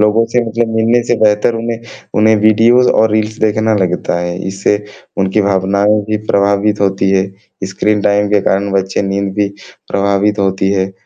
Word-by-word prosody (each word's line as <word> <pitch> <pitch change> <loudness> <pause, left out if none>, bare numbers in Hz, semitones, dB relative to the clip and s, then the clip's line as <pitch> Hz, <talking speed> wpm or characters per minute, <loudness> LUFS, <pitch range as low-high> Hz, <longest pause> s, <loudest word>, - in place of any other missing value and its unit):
लोगों 105 +2 +3
से 125 - +3
मतलब 115 0 -2
मिलने 115 +2 +2
से 120 - +3
बेहतर 105 +2 +2
उन्हें 115 0 -4 0.4
उन्हें 110 +1 +4
वीडियोज़ 115 +4 +4
और 110 0 +2
रील्स 110 0 -1
देखना 110 +1 +1
लगता 90 -2 -1
है, 85 0 -4
इससे 100 +2 -1 0.3
उनकी 95 +2 +1
भावनाओं 100 +2 +1
भी 110 +1 -2
प्रभावित 100 +1 +1
होती 95 -1 +1
हैं। 95 0 -3
स्क्रीन 105 +2 0
टाइम 105 0 +1
के 105 -1 +3
कारण 100 +1 0
बच्चे 95 0 -1
नींद 100 0 -2
भी 105 -1 0 0.4
प्रभावित 100 +1 0
होती 95 0 0
है 95 -1 -1
105 Hz, 170 wpm, -14 LUFS, 95-110 Hz, 0.4 s, उन्हें